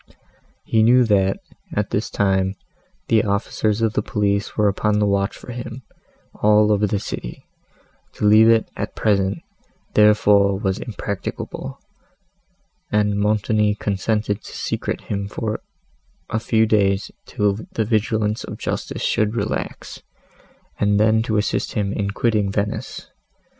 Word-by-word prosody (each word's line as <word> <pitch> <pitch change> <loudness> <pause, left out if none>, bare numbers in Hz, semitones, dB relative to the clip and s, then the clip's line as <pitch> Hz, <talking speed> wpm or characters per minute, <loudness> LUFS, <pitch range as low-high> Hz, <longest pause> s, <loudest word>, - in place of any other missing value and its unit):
He 110 - +2
knew, 125 +3 +6
that, 100 -4 +2 0.4
at - - -1
this - - -1
time, 95 -1 +1 0.5
the 110 -2 +3
officers 105 +1 0
of 110 -1 +1
the - - +1
police 100 0 -1
were 105 -1 +3
upon 105 +1 +1
the 105 - +2
watch 100 0 0
for - - -10
him, 120 +1 -7 0.5
all 105 0 +4
over 105 0 +2
the 100 - 0
city; - - -6 0.7
to - - -3
leave 110 +2 +7
it, 115 -1 +4
at - - -5
present, 100 -2 +1 0.5
therefore, 105 -2 +4
was 95 -2 -1
impracticable, 100 -4 -5 1.1
and 105 -1 +1
Montoni 105 0 +1
consented 105 +1 -1
to - - -9
secrete - - -3
him 100 -1 -4
for 110 +1 -3 0.7
a 110 - 0
few 110 0 +2
days 100 -2 +1 0.2
till 105 0 0
the 110 - 0
vigilance 110 0 0
of - - -7
justice - - -4
should 105 +1 +1
relax, - - -4 0.8
and 105 0 +2
then 110 +1 +4
to 110 -1 -1
assist 105 - -1
him 100 -2 -1
in 100 -1 -2
quitting 105 -1 0
Venice. 100 +1 -3
105 Hz, 135 wpm, -21 LUFS, 100-110 Hz, 1.1 s, leave